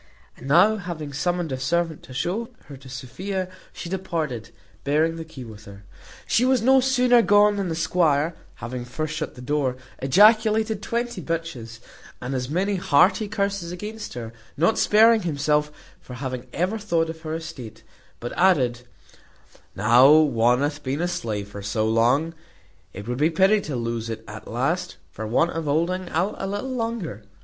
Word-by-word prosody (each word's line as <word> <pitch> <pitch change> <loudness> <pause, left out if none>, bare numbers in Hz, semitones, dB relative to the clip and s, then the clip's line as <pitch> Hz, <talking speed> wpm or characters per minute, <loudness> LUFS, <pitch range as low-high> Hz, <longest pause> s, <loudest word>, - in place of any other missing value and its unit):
And 130 - -11
now 185 +9 +5
having 165 -7 -6
summoned 175 +1 -1
a 130 - -3
servant 165 +3 -1
to 130 - -13
show 200 - -2 0.2
her 140 - -10
to 135 0 -13
Sophia, 180 +10 -4 0.2
she - - -8
departed, 165 - -3 0.3
bearing 155 +3 +1
the 165 - -6
key 160 -5 -10
with 110 -2 -12
her. 100 0 -12 0.4
She 235 - +2
was 255 -3 +3
no 265 +2 +6
sooner 250 -2 +4
gone, 205 -1 +4
than 195 -3 -2
the 165 - -2
squire 165 -2 +1 0.2
(having 120 +2 -6
first 150 +5 -4
shut - - -4
the 125 - -10
door) 135 -2 0 0.2
ejaculated 215 - +4
twenty 235 -4 -3
bitches, 135 -10 -5 0.4
and 125 +2 -5
as 125 -1 -3
many 190 +5 0
hearty 185 +6 +3
curses 200 -4 -2
against 210 - -7
her, 115 -2 -6 0.2
not 170 +9 +2
sparing 220 +1 +5
himself 150 -2 0 0.3
for 125 - -10
having 130 -1 -5
ever 185 +7 -1
thought 165 -6 0
of 160 0 -13
her 160 0 -4
estate; 160 -9 -8 0.4
but 120 - -5
added, 130 -10 +3 0.9
"Now 120 +7 +6
one 125 -5 +4
hath 145 0 -2
been 140 +4 -2
a 175 - +1
slave 105 - -4
so 110 +2 0
long, 120 +9 +2 0.6
it 100 +3 -9
would 125 +1 -3
be 155 +2 +4
pity 195 +5 +3
to 150 - -5
lose 115 -1 -3
it 110 0 -5
at - - -9
last, - - -2
for 110 +1 -6
want 165 +10 +2
of 165 -1 -4
holding 170 +5 0
out 180 +6 0
a 195 - -3
little 205 +7 -4
longer. 225 - -3
160 Hz, 170 wpm, -24 LUFS, 125-195 Hz, 0.9 s, no